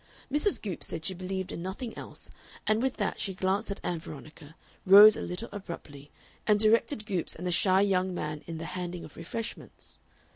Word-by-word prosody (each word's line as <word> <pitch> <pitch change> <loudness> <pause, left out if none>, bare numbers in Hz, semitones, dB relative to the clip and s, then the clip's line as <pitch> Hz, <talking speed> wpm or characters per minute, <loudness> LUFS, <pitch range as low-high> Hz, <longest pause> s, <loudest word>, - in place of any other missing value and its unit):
Mrs. 300 +8 +2
Goopes 195 -6 -2
said 160 -1 -4
she 190 - 0
believed 185 +1 -4
in - - -5
nothing 200 +6 -5
else, - - -5 0.3
and 215 +1 +2
with 265 0 -1
that 205 - -1
she 190 - -1
glanced 190 +3 0
at 200 - -4
Ann 175 -2 -2
Veronica, 155 0 -11 0.3
rose 205 +3 +10
a - - -5
little 180 +6 -4
abruptly, 150 -7 -8 0.4
and 210 -1 +4
directed 220 +2 +3
Goopes 190 -6 -1
and 180 - -7
the 180 - 0
shy 185 +2 +4
young 190 -2 +2
man 150 -4 -4
in 165 -1 -5
the 165 - -5
handing 175 0 -5
of 155 - -14
refreshments. 215 +7 -7
185 Hz, 190 wpm, -29 LUFS, 170-210 Hz, 0.4 s, rose